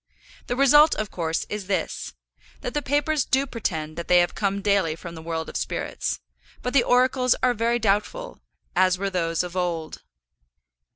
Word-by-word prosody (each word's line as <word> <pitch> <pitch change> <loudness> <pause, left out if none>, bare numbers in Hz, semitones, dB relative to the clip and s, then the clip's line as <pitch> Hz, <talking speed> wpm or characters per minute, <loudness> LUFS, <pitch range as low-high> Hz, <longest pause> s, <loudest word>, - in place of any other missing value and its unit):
The 245 - -1
result, 295 +4 +6
of 215 -1 -3
course, 165 -2 -2
is 205 -2 -5
this, 195 - -2 0.5
that - - -4
the 295 - 0
papers 290 +1 +1
do 270 +1 +1
pretend 160 - -4
that 170 - -5
they 180 - +5
have 175 0 +3
come 200 -1 -1
daily 200 -6 +2
from 170 +1 -9
the 160 - -9
world 160 0 -4
of - - -9
spirits; - - -3 0.4
but 250 - -2
the 275 - +6
oracles 250 +1 +3
are 250 -1 +4
very 235 +1 +1
doubtful, 230 - -1 0.4
as 185 0 +4
were 195 +1 -2
those 165 -2 0
of 180 0 -7
old. 170 -3 -2
200 Hz, 175 wpm, -24 LUFS, 175-250 Hz, 0.5 s, result